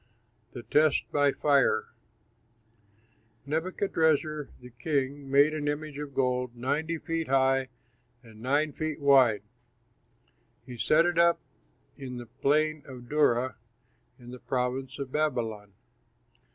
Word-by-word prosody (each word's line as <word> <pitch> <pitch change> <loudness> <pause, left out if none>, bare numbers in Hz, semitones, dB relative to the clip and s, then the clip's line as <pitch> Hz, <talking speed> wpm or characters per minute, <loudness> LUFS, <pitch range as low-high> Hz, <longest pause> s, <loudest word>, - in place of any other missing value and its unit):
THE 120 - -8
TEST 150 +6 +2
BY 145 -1 +3
FIRE 140 -3 +2 1.6
Nebuchadrezzar, 160 -2 0
the 125 0 -13
king, 140 +2 -2
made 140 +3 +4
an 150 -1 -3
image 145 0 -3
of 145 -2 -7
gold 125 -2 0
ninety 145 +7 -2
feet 165 0 -3
high 135 0 +2 0.5
and 110 -2 -15
nine 145 +4 +1
feet 155 -1 -4
wide. 135 -7 +4 1.2
He 125 - -9
set 165 +8 +4
it 175 -1 +1
up 170 0 +4 0.6
in 130 -2 -6
the 120 - -7
plain 155 +6 0
of 125 -3 -11
Dura, 130 -5 +2 0.6
in 120 -2 -12
the 125 - -9
province 130 +2 -3
of 140 -2 -6
Babylon. 115 -9 -2
140 Hz, 120 wpm, -28 LUFS, 125-155 Hz, 1.6 s, made